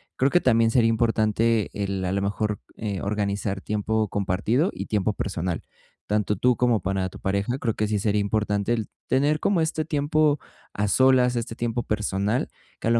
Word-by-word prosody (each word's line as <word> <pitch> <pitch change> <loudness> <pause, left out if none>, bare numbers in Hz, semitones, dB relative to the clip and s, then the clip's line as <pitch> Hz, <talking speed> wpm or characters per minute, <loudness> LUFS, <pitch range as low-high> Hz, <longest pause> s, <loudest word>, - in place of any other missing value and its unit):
Creo 135 +2 +2
que 175 - +4
también 115 -2 +3
sería 115 -1 +4
importante 115 -1 +2
el, 100 -2 -2
a 90 - -1
lo 100 - 0
mejor, 105 +1 -1 0.2
eh, 100 -3 -3
organizar 100 -1 -2
tiempo 105 +1 -1
compartido 105 - 0
y - - -6
tiempo 105 0 0
personal, 90 -4 -3 0.5
tanto 105 0 +1
tú 125 +3 +3
como 120 -3 +2
para 95 0 -1
tu - - -12
pareja, 100 +6 -1
creo 115 -5 -1
que 105 - 0
sí 105 -1 0
sería 105 0 +1
importante 105 +1 0
el 110 -3 -2 0.2
tener 145 +4 +2
como 180 0 +2
este 160 -1 -1
tiempo 150 -1 +2 0.3
a 105 0 -1
solas, 130 +1 +4
este 115 -1 -3
tiempo 120 0 -2
personal, 105 +2 -1 0.3
que - - -3
a - - +3
lo 115 - +4
110 Hz, 185 wpm, -25 LUFS, 100-125 Hz, 0.5 s, que